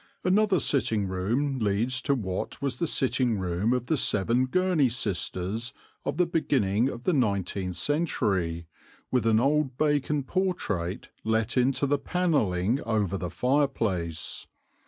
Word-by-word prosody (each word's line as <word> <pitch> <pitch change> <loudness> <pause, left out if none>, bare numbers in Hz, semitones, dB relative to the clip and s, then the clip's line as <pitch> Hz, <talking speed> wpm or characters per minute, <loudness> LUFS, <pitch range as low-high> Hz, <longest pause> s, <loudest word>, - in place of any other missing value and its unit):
Another 195 0 +3
sitting 110 -9 +1
room 120 +10 -1
leads 115 +5 0
to 140 +1 +1
what 95 -7 -4
was 140 -2 -2
the 170 - 0
sitting 130 -5 +1
room 95 +4 0
of 125 -1 0
the 155 +4 +1
seven 115 +4 +2
Gurney 180 -3 +2
sisters 110 +1 -2 0.3
of 140 - -2
the 180 - +4
beginning 130 - +1
of 120 -2 -7
the 180 - +2
nineteenth 100 - 0
century, 95 - 0 0.5
with 125 -3 +1
an 110 -1 +4
old 135 0 +1
Bacon 145 -1 +1
portrait 120 - -2
let 110 +1 0
into 130 +2 +2
the 140 +1 +1
panelling 135 - +1
over 105 -5 0
the 90 -2 -3
fireplace. 115 - -1
125 Hz, 135 wpm, -27 LUFS, 100-145 Hz, 0.5 s, the